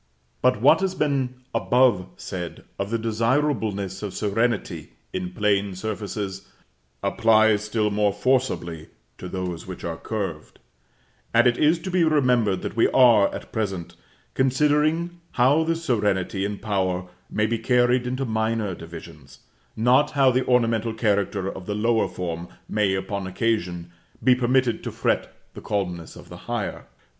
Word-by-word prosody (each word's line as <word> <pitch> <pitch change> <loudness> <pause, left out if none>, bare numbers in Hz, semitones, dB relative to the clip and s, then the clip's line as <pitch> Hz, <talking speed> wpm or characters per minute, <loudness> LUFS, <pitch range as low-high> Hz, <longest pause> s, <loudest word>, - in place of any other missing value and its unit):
But 125 -3 +3
what 155 +4 +6
has 190 -1 -1
been 135 -6 0 0.2
above 120 -7 +3
said 90 -2 -6 0.2
of 100 0 -2
the 115 - 0
desireableness 110 -4 0
of 105 -3 -5
serenity 115 +2 -1 0.2
in 90 -1 -3
plane 100 -1 0
surfaces, 100 -1 -5 0.6
applies 110 -1 +3
still 105 0 0
more 105 0 +2
forcibly 105 -8 -1 0.3
to 90 - -7
those 90 -3 -4
which 95 - -8
are 85 -1 -4
curved; 95 -8 -5 0.8
and 120 +1 +6
it 120 -1 +3
is 155 +3 +4
to 185 - -5
be 180 -1 +3
remembered 125 - +2
that - - -4
we 115 - +4
are, 115 -6 +5
at - - -8
present, 95 -6 -3 0.4
considering 150 +6 +1
how 140 +5 +4
this 165 +1 -2
serenity 100 - 0
and 100 0 -5
power 95 -4 -1 0.2
may 105 - 0
be 115 +1 -1
carried 125 +1 +2
into 130 +2 -2
minor 110 -3 -1
divisions, 80 -5 -11 0.3
not 125 +6 +4
how 135 -2 +5
the 130 +1 +1
ornamental 115 -2 +2
character 100 -4 0
of 95 -1 -7
the 105 - -2
lower 110 +1 +2
form 85 -1 -5 0.2
may, 100 -3 +1
upon 95 0 -3
occasion, 90 -4 -2 0.3
be 130 - +6
permitted 125 -1 +1
to - - -4
fret - - -1 0.2
the - - -9
calmness 90 -5 -3
of - - -13
the - - -10
higher. - - -3
110 Hz, 150 wpm, -24 LUFS, 95-125 Hz, 0.8 s, what